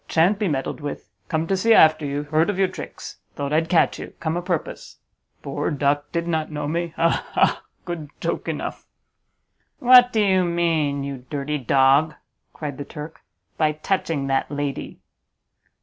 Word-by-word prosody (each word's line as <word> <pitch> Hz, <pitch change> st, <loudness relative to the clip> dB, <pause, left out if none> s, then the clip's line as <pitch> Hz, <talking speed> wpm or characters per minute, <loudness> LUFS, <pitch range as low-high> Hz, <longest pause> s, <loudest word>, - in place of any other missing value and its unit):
shan't 180 Hz, +5 st, +3 dB
be 210 Hz, -, +1 dB
meddled 145 Hz, 0 st, -2 dB
with; 145 Hz, -7 st, -6 dB, 0.2 s
come 160 Hz, +6 st, -1 dB
to 195 Hz, -, 0 dB
see 225 Hz, +4 st, +4 dB
after 155 Hz, -1 st, +5 dB
you. 140 Hz, +1 st, -2 dB
Heard 155 Hz, +4 st, +1 dB
of 205 Hz, -, -1 dB
your 190 Hz, -1 st, +3 dB
tricks; -, -, -9 dB, 0.2 s
thought 140 Hz, +1 st, -3 dB
I'd 160 Hz, +1 st, +1 dB
catch 175 Hz, -, +3 dB
you! -, -, -8 dB
come 160 Hz, 0 st, -2 dB
o' 175 Hz, -, -1 dB
purpose. 175 Hz, -3 st, -4 dB, 0.5 s
Poor -, -, -2 dB
duck! 145 Hz, 0 st, 0 dB
did 170 Hz, 0 st, -2 dB
not 160 Hz, -2 st, -1 dB
know 150 Hz, -1 st, -3 dB
me! 170 Hz, +1 st, -2 dB
ha! 165 Hz, 0 st, +1 dB
ha! -, -, +2 dB, 0.2 s
good 170 Hz, -5 st, -5 dB
joke -, -, -3 dB
enough!" -, -, -5 dB, 0.9 s
"What 250 Hz, 0 st, +7 dB
do 220 Hz, -, +1 dB
you 190 Hz, -2 st, +3 dB
mean, 165 Hz, -5 st, 0 dB
you 135 Hz, -2 st, -6 dB
dirty 150 Hz, +1 st, -2 dB
dog," 140 Hz, +4 st, +3 dB, 0.4 s
cried 145 Hz, -3 st, -6 dB
the -, -, -3 dB
Turk, 150 Hz, +2 st, -9 dB, 0.4 s
"by 155 Hz, -1 st, +3 dB
touching 155 Hz, -3 st, -1 dB
that 135 Hz, 0 st, 0 dB
lady?" 145 Hz, -1 st, -4 dB
155 Hz, 170 wpm, -23 LUFS, 145-170 Hz, 0.9 s, What